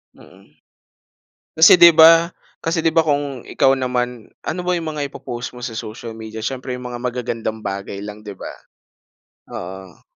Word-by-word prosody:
Mm. 95 -5 -19 1.0
Kasi, 160 - +9
di 170 - +10
'ba 165 +1 +7 0.3
Kasi 165 0 -1
di 165 - +3
'ba? 165 - +3
Kung 140 -4 -2
ikaw 135 -1 +3
naman, 125 -3 -2 0.2
ano 180 - -3
ba 180 - +2
yung 165 -2 -3
mga 150 -2 -3
ipo-post 120 -2 -7
mo 125 - -10
sa 120 - -4
social 115 +1 -8
media? 110 0 -8
Siyempre, 130 +1 -4
yung 125 0 -7
mga 120 - -6
magagandang 120 -3 -4
bagay 100 0 -5
lang 105 0 -8
di 105 -2 -9
'ba? - - -8 1.0
Oo. 95 0 -9
125 Hz, 165 wpm, -20 LUFS, 110-145 Hz, 1.0 s, di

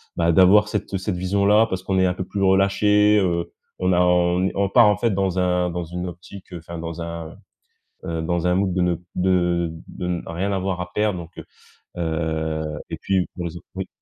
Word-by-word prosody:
bah, 85 0 +2
d'avoir 95 +5 +6
cette 105 -1 -3
cette 95 +1 -3
vision-là, 100 +4 +3
parce 95 -3 -3
qu'on 95 0 -1
est 95 - +4
un 90 - +1
peu 95 +1 -4
plus 100 +1 -3
relâché, 105 +2 +4
heu, 85 -3 -1 0.3
on 90 0 +2
a 90 - +3
on 90 0 +3
n 95 - +1
on 100 0 0
part, 120 -2 +6
en 105 - +4
fait, 115 +4 +1
dans 95 -1 0
un 90 -1 +1
dans 85 0 -4
une 90 +2 -5
optique, 90 +2 -11
heu, - - -4
enfin 85 +1 -9
dans 85 0 -6
un, 85 -1 -6 0.7
heu, - - -6
un 85 +2 0
mood 95 0 +1
de 90 - 0
ne 90 -1 +1 0.2
de 90 -2 +1 0.2
de 90 - -6
ne 90 -1 -2
rien 95 +4 -2
avoir 95 -1 -2
à 90 0 -6
perdre. 105 -3 0
Donc 85 -1 -9
heu, - - -8 0.5
heu, 80 -1 -2 0.3
et - - -4
puis 95 -2 0
pour 90 - -5
les 85 0 -5
autres - - -14
oui? 95 0 -4
90 Hz, 220 wpm, -22 LUFS, 85-95 Hz, 0.7 s, d'avoir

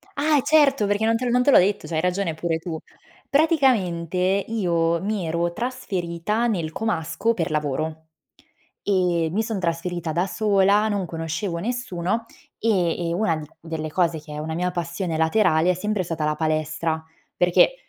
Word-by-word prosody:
Ah 300 +1 +3
e - - +3
certo, 275 -8 +4
perché 205 +2 +1
non 225 0 +3
te 250 +2 -2
l'ho 240 - 0
non 250 0 +3
te 285 - +4
l'ho - - +8
detto, 195 +3 +2
c'hai 160 -1 -1
ragione 180 -2 0
pure 165 0 -1
tu. 165 -1 -5 0.5
Praticamente 245 - +2 0.3
io 170 -6 +1
mi 205 -4 -1
ero 170 +1 0
trasferita 210 -3 -2
nel 170 -8 -1
comasco, 175 +1 -1
per 165 -6 -2
lavoro 155 +2 -2 0.8
e 180 -4 +1
mi 215 +3 +1
son 220 -2 -3
trasferita 170 -1 -2
da 175 +4 +1
sola, 205 +1 +3
non 200 -3 -1
conoscevo 165 +2 -3
nessuno 225 -1 -2 0.3
e 175 -6 +1
e - - 0
una 170 -3 +1
di 155 -1 -7
delle 160 -1 -5
cose 170 -2 +1
che 150 0 -12
è - - -5
una 160 +1 -4
mia 180 +2 0
passione 175 0 -3
laterale 160 0 +3
è - - +2
sempre 210 +1 -1
stata 165 -2 -3
la 150 0 0
palestra, 155 +1 -1 0.3
perché 180 - +4
175 Hz, 170 wpm, -23 LUFS, 165-215 Hz, 0.8 s, l'ho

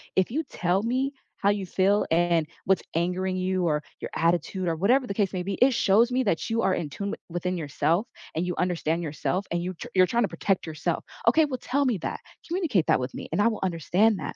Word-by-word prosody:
if 190 +4 +2
you 315 +4 0
tell 185 -7 0
me 260 +4 0 0.2
how 200 - +2
you 205 -1 0
feel 195 +3 +2
and 170 -1 +3 0.2
what's 190 -2 +3
angering 180 +2 0
you 185 0 0
or 150 -1 0 0.2
your - - -4
attitude 175 +2 0
or 165 - +1
whatever 245 +10 +3
the 200 - -2
case 200 -1 +1
may 180 -1 -2
be, 195 - -3
it 255 +5 +4
shows 225 +5 +4
me 255 +1 +2
that 200 -4 0
you 225 0 +1
are 190 - +3
in 160 -5 -2
tune 200 +8 -4
w - - -3
within 175 +2 -2
yourself 165 - 0 0.3
and 165 +3 0
you 180 - -2
understand 170 -2 0
yourself 165 +5 -2
and 170 0 0
you 185 +1 -3
tr 160 - -8
you're 185 -1 +6
trying 235 +4 +1
to - - +2
protect 195 -2 -1
yourself. 160 +2 -2 0.2
Okay, 310 +7 +6
"Well, 260 -4 -4
tell 280 +3 0
me 245 -6 +1
that. - - -4 0.3
Communicate 330 - +1
that - - +4
with 125 +1 -4
me, - - -7
and - - +1
I - - +5
will 220 - -4
understand 190 +5 +2
that," - - -5
185 Hz, 240 wpm, -26 LUFS, 170-225 Hz, 0.3 s, you're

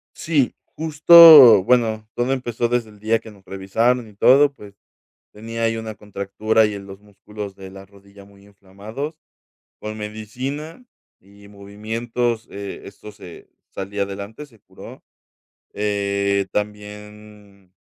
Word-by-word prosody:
Sí, 150 -6 -1 0.2
justo, 155 - +8
bueno, 110 -3 +1
todo 120 +2 -1
empezó 120 -2 -2
desde 120 -2 -2
el 105 - -19
día 110 +2 0
que 110 0 -14
nos 100 -2 -20
revisaron 110 +6 -1
y 105 - -18
todo. 140 +7 +4
Pues, 105 -6 -15 0.6
tenía 115 +2 -7
ahí 115 0 0
una 110 -1 -7
contractura 105 +2 -1
y 105 - -3
en 100 -1 -9
los 95 0 -12
músculos 105 0 -10
de 95 -1 -11
la 95 0 -13
rodilla 100 0 -19
muy 100 0 -21
inflamados. 100 - -9 0.6
Con 110 0 -7
medicina 125 - -7 0.4
y 100 +1 -19
movimientos, 115 +3 -4
eh, 100 0 -8
esto 100 +2 -12
se 95 -5 -14 0.2
salí 100 +1 -7
adelante, 100 +7 -6
se 115 -7 -24
curó. - - -14 0.7
Eh, 100 -1 -1
también 105 -2 -8
105 Hz, 135 wpm, -20 LUFS, 100-115 Hz, 0.7 s, justo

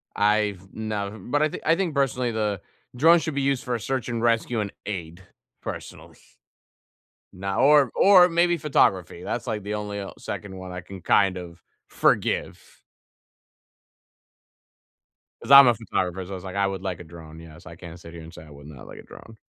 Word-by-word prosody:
I've 105 -2 0
nev 105 -1 -5
but 145 - +2
I 155 - +2
think - - -8
I 165 - +4
think 180 -3 -2
personally 125 -3 0
the 105 -3 -2 0.3
drone 165 +6 +5
should 160 -3 -4
be 140 - 0
used 135 -1 0
for 125 - -2
a - - -3
search 130 +2 -3
and 115 -1 -3
rescue 115 0 +1
and 100 -2 -3
aid, 90 -3 -6 0.4
personally. - - -9 1.2
No 95 +1 -4
or 140 -2 +5
or 185 -2 +6
maybe 175 +1 +2
photography, 95 - +1
that's 120 - -4
like 105 -2 -3
the 105 - -4
only, 105 -1 -4
uh, 100 - -6
second 100 -2 -7
one 95 0 -8
I 90 0 -6
can 95 0 -11
kind 95 +1 +2
of 85 -1 -10 0.3
forgive. - - 0 2.8
'Cause - - -5
I'm 140 -2 +10
a 120 - +5
photographer, 95 -4 -3
so 95 - -11
I - - -4
was 90 - -9
like 95 -1 -8
I 100 0 +2
would 95 -1 -5
like 95 -3 -4
a - - -9
drone, 80 -1 -12
yes. 80 0 -14
I 85 -2 -11
can't 85 0 -11
sit 85 -1 -13
here 85 - -10
and 80 +2 -12
say - - -12
I 80 - -16
would 70 0 -13
not 75 -4 -12
like - - -11
a - - -12
drone. 115 -1 -14
105 Hz, 195 wpm, -24 LUFS, 90-125 Hz, 2.8 s, I'm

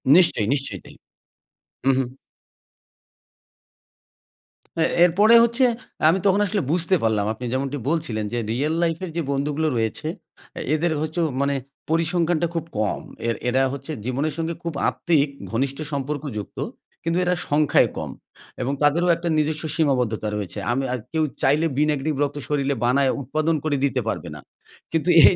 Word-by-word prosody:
নিশ্চয়ই, 165 - +4
নিশ্চয়ই 135 -9 -3
তাই। - - -13 0.9
উ, - - +7
হু। 135 - +2 2.8
এ - - +5 0.2
এরপরে 205 +7 +5
হচ্ছে 235 +2 +3 0.4
আমি 190 +3 +3
তখন 195 +1 +4
আসলে 205 0 0
বুঝতে 175 +2 +3
পারলাম 105 -2 +2
আপনি 125 +3 -7
যেমনটি 135 +2 -1
বলছিলেন 115 -10 -1
যে 120 - 0
রিয়েল 145 +7 0
লাইফের 170 +2 -1
যে - - +1
বন্ধুগুলো 145 +3 0
রয়েছে, 115 +7 -1 0.7
এদের 165 +2 +1
হচ্ছে 160 +2 -3 0.2
মানে 140 0 +1 0.3
পরিসংখ্যানটা 165 0 +1
খুব 165 -1 -1
কম। 105 - 0 0.3
এর 115 - +1
এরা 130 +2 +2
হচ্ছে 140 +3 -6
জীবনের 140 +5 -1
সঙ্গে 165 0 -1
খুব 170 -2 -3 0.2
আত্মিক 150 -4 +1 0.2
ঘনিষ্ঠ 135 +4 -1
সম্পর্কযুক্ত। 140 -6 -4 0.4
কিন্তু 165 +2 +1
এরা 180 0 +2
সংখ্যায় 150 0 +4
কম। - - -4 0.5
এবং 135 +3 -1
তাদেরও 170 +5 +3
একটা 170 0 -3
নিজস্ব 155 +1 0
সীমাবদ্ধতা 125 -8 +1
রয়েছে। 100 -3 -4
আমি 135 +2 0
আ - - +1 0.2
কেউ 160 -1 +2 0.2
চাইলে 150 +4 +3
'বি 150 - +3
নেগেটিভ' 150 +1 -1
রক্ত 145 +1 -2
শরীলে 140 -2 0
বানায় 135 +2 +3
উৎপাদন 155 +5 0
করে 150 -2 +1
দিতে 130 -2 0
পারবে 85 -6 -3
না। - - -9 0.5
কিন্তু 165 +2 0
এই 185 - +8
150 Hz, 150 wpm, -23 LUFS, 135-165 Hz, 2.8 s, এই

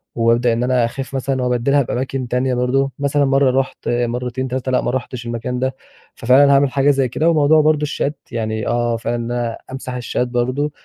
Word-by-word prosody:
وأبدأ 115 +1 +2
إن 115 +1 -1
أنا 125 -1 +2
أخف 135 +3 -6
مثلًا 130 0 -1
وأبدلها 125 +3 +2
بأماكن 130 0 -3
تانية 125 +2 0
برضه، 135 +3 +1
مثلًا 140 0 +1
مرة 135 -1 +3
رُحت 130 - -3
مرتين 125 +2 -2
3 130 0 -3
لأ 125 - +2
ما - - -1
رُحتش 125 -1 -4
المكان 120 +2 -3
ده، 130 0 -1 0.4
ففعلًا 135 +4 +4
هاعمل 140 -1 +4
حاجة 140 +2 +3
زي 135 -2 +1
كده. 155 +7 +1
وموضوع 155 -1 +4
برضه 155 0 +2
الشات 145 0 -2
يعني 110 -2 -3
آه 120 -1 0
فعلًا 115 +1 -2
إن 120 0 -4
أنا 120 -1 -2
أمسح 130 -1 -6
الشات 125 0 -2
برضه، 130 +4 -1
125 Hz, 195 wpm, -19 LUFS, 120-135 Hz, 0.4 s, ففعلًا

